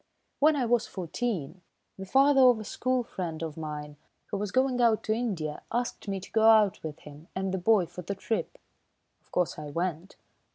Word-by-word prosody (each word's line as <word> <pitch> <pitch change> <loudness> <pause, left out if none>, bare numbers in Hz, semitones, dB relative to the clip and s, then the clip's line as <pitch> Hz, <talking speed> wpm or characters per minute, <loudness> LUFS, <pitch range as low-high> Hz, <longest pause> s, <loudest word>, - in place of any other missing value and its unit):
When 305 +2 +5
I 265 -4 +1
was 235 0 +2
fourteen, 180 - -4 0.3
the 190 0 -8
father 270 +4 +5
of 250 -3 +6
a - - -5
school 255 +4 -1
friend 170 -8 -5
of 160 -2 -5
mine, 150 -2 -6 0.3
who 205 - -1
was 210 0 -2
going 255 +1 +1
out 230 -2 +3
to 215 - +1
India, 190 -11 -3
asked 240 -2 -2
me 195 -1 -2
to - - -12
go 220 - +2
out 215 -4 +5
with 155 -2 -6
him 150 +2 -13
and 190 0 -1
the 190 - -1
boy 200 0 +4
for 175 +2 -9
the 200 +3 -4
trip. 220 +3 -3 0.6
Of - - -34
course, 180 -3 0
I 150 -1 -6
went." 170 +3 -3
195 Hz, 200 wpm, -28 LUFS, 165-235 Hz, 0.6 s, of